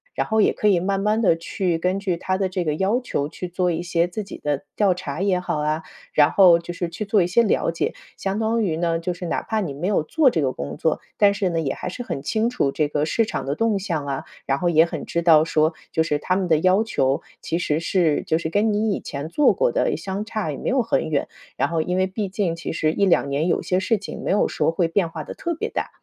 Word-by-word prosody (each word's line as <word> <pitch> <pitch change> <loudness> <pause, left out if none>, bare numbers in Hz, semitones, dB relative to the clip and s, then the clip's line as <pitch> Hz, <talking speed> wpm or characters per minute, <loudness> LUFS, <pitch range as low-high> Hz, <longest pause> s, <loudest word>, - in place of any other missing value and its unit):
然 - - 0
后 220 - +1
也 210 - +4
可 210 - 0
以 185 -4 +4
慢 195 +2 -1
慢 210 +2 +1
地 185 -7 +4
去 170 +1 -2
根 180 +3 0
据 190 -3 -1
它 185 +2 -2
的 190 0 0
这 185 -1 -2
个 155 -2 -1
要 200 +9 +1
求 145 - -2
去 175 +3 -7
做 180 +1 0
一 170 0 -2
些 170 0 +1
自 195 +4 -5
己 195 - -9
的 145 +1 -2
调 200 -3 +4
查 175 -3 -5
也 195 -2 +2
好 180 - -2
啊， 155 +2 -1 0.3
然 145 -1 +5
后 180 -4 +7
就 170 +1 -7
是 175 0 -3
去 170 +5 -5
做 205 0 +3
一 175 - +2
些 210 +7 +3
了 205 - +1
解。 165 - -1 0.2
相 195 +2 -2
当 225 +1 +1
于 165 -6 -1
呢， 165 -1 0
就 175 +2 -2
是 175 +1 -7
哪 170 - -1
怕 220 - -2
你 175 -9 -3
没 150 +6 -3
有 205 - +2
做 290 - +3
这 165 - 0
个 130 -2 0
工 70 - -6
作， - - 0 0.2
但 200 -1 +5
是 200 -2 0
呢， 165 -1 -1
也 150 -4 -1
还 - - -5
是 215 - -7
很 190 - -4
清 220 +9 0
楚 240 - 0
这 150 +1 0
个 145 0 -1
市 225 +9 +1
场 135 - -4
的 140 +1 -2
动 225 +2 +1
向 170 -7 -3
啊， 135 -1 -3 0.2
然 135 - +1
后 175 +4 +1
也 160 -1 +5
很 165 -3 -6
知 170 - -1
道 160 -2 +6
说 160 0 +1 0.2
就 160 - +1
是 160 -2 +1
它 185 +5 0
们 190 -2 -1
的 160 -2 +4
要 185 +5 +4
求， 135 -10 0 0.2
其 165 - -2
实 155 -2 0
是 170 -4 +1
就 160 - +1
是 160 -1 -3
跟 210 +6 +2
你 215 +1 +1
以 - - -2
前 140 +1 -5
做 290 - +4
过 - - +1
的 - - +1
相 195 +1 -4
差 215 -5 -3
也 - - -6
没 - - -3
有 260 0 +2
很 230 -8 0
远， 145 -3 0 0.3
然 - - +2
后 165 -1 0
因 180 +3 -1
为 185 0 +2
毕 195 +1 -3
竟 185 -3 -1
其 170 - -5
实 155 -1 0
1、2 190 -7 +2
年 145 +4 0
有 - - +1
些 185 - 0
事 225 +4 +1
情 200 - -8
没 - - -1
有 200 - +3
说 - - 0
会 170 +1 +1
变 165 +1 0
化 - - -6
得 - - -7
特 340 - -3
别 325 - -3
大。 - - -3
175 Hz, 295 characters per minute, -22 LUFS, 160-200 Hz, 0.3 s, 后